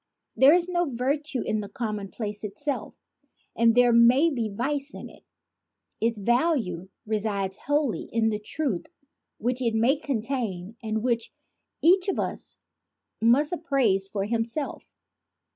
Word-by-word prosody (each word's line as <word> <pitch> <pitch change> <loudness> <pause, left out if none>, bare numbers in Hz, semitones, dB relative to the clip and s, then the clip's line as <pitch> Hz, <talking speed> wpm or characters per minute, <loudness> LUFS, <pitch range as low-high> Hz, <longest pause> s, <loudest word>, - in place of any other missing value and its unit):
There 270 +3 +7
is 350 0 +1
no 350 -1 +1
virtue 275 +2 -1
in 215 - 0
the 200 -1 -6
commonplace 210 -1 -4
itself, 220 +3 -4 0.6
and 230 0 +4
there 245 -1 +5
may 250 +8 +6
be 235 -6 -2
vice 275 +7 -2
in - - -8
it. - - -18 0.8
Its 230 0 +1
value 225 - 0 0.2
resides 205 -3 -1
wholly 290 -4 -1
in 225 -1 +2
the 210 -1 -2
truth 215 - -3 0.5
which 250 +3 -1
it 230 -3 +1
may 240 +6 +3
contain 225 -7 -3
and 220 -1 -2
which 235 -2 0 0.5
each 365 +4 +5
of 390 - 0
us - - -3 0.6
must 270 +8 +4
appraise 260 - +1
for 195 -1 -2
himself. 230 +6 -2
235 Hz, 135 wpm, -26 LUFS, 215-280 Hz, 0.8 s, There